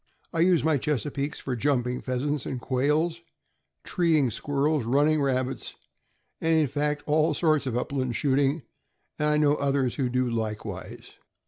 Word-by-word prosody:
I 165 - -1
use 175 -1 +4
my 155 -2 +2
Chesapeakes 145 +1 -2
for 130 - -3
jumping 125 -1 0
pheasants 135 +3 -2
and 130 - -3
quails, 150 +7 0 0.6
treeing 160 - +2
squirrels, 145 +4 0
running 145 +6 +2
rabbits, 130 -1 -1 0.7
and 165 0 +2
in 160 -1 +4
fact 145 +2 -2
all 155 +1 +2
sorts 155 -5 +2
of 120 -2 -1
upland 130 -2 -2
shooting, 140 +1 +1 0.6
and 150 - +1
I 150 - +3
know 150 -1 +3
others 135 -3 0
who 130 -4 0
do 125 0 0
likewise. 110 -2 -5
140 Hz, 145 wpm, -26 LUFS, 130-150 Hz, 0.7 s, use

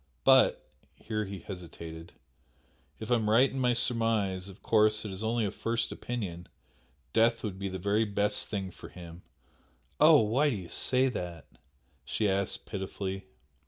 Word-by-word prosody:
But" - - +5 0.3
here 110 -1 -3
he 95 -2 -7
hesitated 85 -3 -9 0.9
"if 110 +2 -6
I - - +6
am 110 -2 -1
right 120 +5 +6
in 135 - -4
my 125 -1 +3
surmise, 110 -6 +1
of 95 - -14
course 110 -1 +3
it 105 - -4
is 95 +3 -5
only 115 0 +1
a 100 - -2
first 115 0 -2
opinion 95 -8 -5 0.7
death 115 +1 +3
would 95 -4 -4
be 100 0 -3
the 95 - -4
very 100 +4 +1
best 105 0 0
thing 95 -3 -3
for - - -12
him." 85 -1 -11 0.8
"Oh, - - +8
why 125 +8 +2
do 130 - -1
you 90 -4 -7
say 130 +1 +2
that?" 90 - -6 0.6
she 105 +9 -1
asked, 100 0 -1
pitifully. 95 -1 -5
105 Hz, 160 wpm, -30 LUFS, 95-115 Hz, 0.9 s, Oh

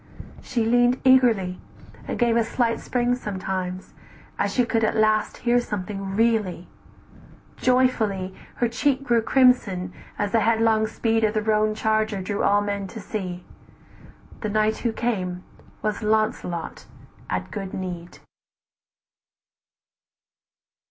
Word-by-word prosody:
She 235 -3 -1
leaned 245 +2 +3
eagerly, 235 -9 +4 0.5
And - - -3
gave 235 -1 +2
a 235 - +3
slight 230 0 0
spring 245 0 0
sometimes, 190 -5 -4 0.5
as - - +1
she 250 - +2
could 225 -2 0
At - - +1
last 215 0 +2
hear 240 0 +4
something 195 -3 -4
really; 215 -6 +1 0.9
joyfully 220 -7 +1 0.2
Her 240 - +1
cheek 265 +3 0
grew 235 -4 +2
crimson, 220 -8 +3 0.2
as 205 -1 -1
the 230 - +3
headlong 220 0 +3
speed 225 0 0
Of 215 0 +1
the 215 - +1
roan 215 0 +2
charger 215 -1 0
drew 200 +2 -3
all 205 0 +3
men 200 -1 -3
to 220 - -9
see, 185 -4 -5 1.0
The 215 - -3
knight 215 +1 +1
who 235 - -1
came 185 -6 -2 0.4
was 215 0 -1
Launcelot 215 -6 -1 0.4
at 90 0 -3
good 195 -2 -5
need. 175 -2 -6
215 Hz, 125 wpm, -24 LUFS, 195-235 Hz, 1.0 s, eagerly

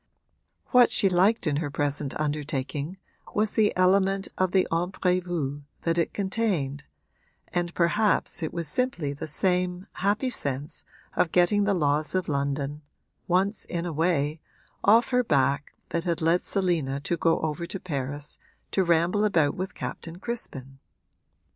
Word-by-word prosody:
What 250 -2 +7
she 195 - +3
liked 190 +5 +3
in 145 -3 +1
her 155 -1 -2
present 145 0 -2
undertaking 145 +2 -2 0.4
was 210 0 +2
the 215 -2 +3
element 195 +1 +3
of 185 -1 +1
the 190 -1 +3
imprévu 175 -4 -1 0.2
that 165 0 +1
it 165 - +1
contained, 190 -9 -1 0.6
and 175 -1 -1
perhaps 200 +4 +2
it 160 - -2
was 170 -2 -2
simply 175 - -1
the 145 - -6
same 180 +3 0
happy 210 +7 0
sense 140 - -4 0.3
of 165 - +2
getting 200 +3 +4
the 200 -1 +2
laws 150 0 +1
of 185 -2 0
London 140 0 -2 0.5
once 190 +4 +1
in 170 0 -3
a 170 - -3
way 155 -1 0 0.4
off 230 +3 +5
her 250 0 +3
back 140 - +1
that 170 +1 -2
had 170 -2 0
led 165 +2 +2
Selina 170 -8 0
to 170 - -1
go 165 -1 +2
over 160 +2 -2
to 195 - -5
Paris 145 -3 -3 0.3
to 190 - +2
ramble 175 +4 +2
about 160 -9 +3
with 185 +1 -5
Captain 165 +1 -6
Crispin. 135 - -6
170 Hz, 150 wpm, -26 LUFS, 145-190 Hz, 0.6 s, What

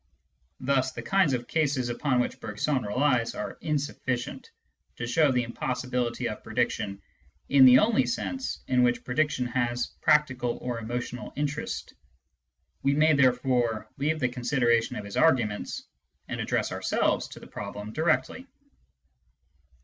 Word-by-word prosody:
Thus 130 0 +1
the - - -6
kinds 195 -7 +3
of 120 -1 -2
cases 140 -6 0
upon 125 +1 0
which 125 - -1
Bergson 130 +6 -1
relies 125 +2 +1
are - - -5
insufficient 140 -5 -3 0.5
to 120 - -4
show 150 +4 +3
the 125 -1 +1
impossibility 125 0 -2
of - - -6
prediction 100 0 -1 0.5
in 135 -1 +7
the 125 0 +9
only 220 - +3
sense 265 +2 -3
in 125 -1 +3
which 120 -1 +2
prediction 145 0 0
has 120 -1 -1
practical 135 -6 +2
or 125 -2 -4
emotional 120 +2 -5
interest. 145 +1 -3 0.9
We 140 +1 +2
may 155 +1 +5
therefore 125 -5 +2
leave 155 +3 0
the 125 -3 +1
consideration 120 -2 +1
of 105 - -5
his 100 - -6
arguments 120 -10 +1 0.4
and - - -4
address - - -1
ourselves - - 0
to - - -11
the - - -12
problem 105 +1 -7
directly. 170 - 0
125 Hz, 135 wpm, -27 LUFS, 120-145 Hz, 0.9 s, the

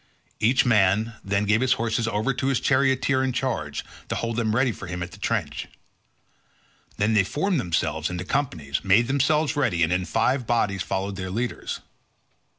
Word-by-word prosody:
Each 120 +4 +3
man 110 0 +3
then 100 +1 0
gave 105 +3 +3
his 130 0 +4
horses 115 -1 -1
over 110 +5 0
to 130 +2 -2
his 135 -3 +2
charioteer 130 -1 +2
in 130 - 0
charge 125 - -2 0.2
to - - -1
hold 115 0 -2
them 110 -2 0
ready 125 +1 +3
for 100 - -8
him 90 0 -4
at 90 - -8
the - - -13
trench. - - -2 1.3
Then 105 +2 +2
they 105 -3 +5
formed 165 - 0
themselves 80 -5 -1
into 90 0 -4
companies, 85 - -2
made 100 +4 +4
themselves 145 +3 +2
ready, 115 -13 +1
and 80 +2 +2
in 90 0 0
five 125 +4 0
bodies 105 -5 +1
followed 95 +1 -3
their 95 -1 -4
leaders. 120 +5 -3
110 Hz, 175 wpm, -25 LUFS, 95-130 Hz, 1.3 s, they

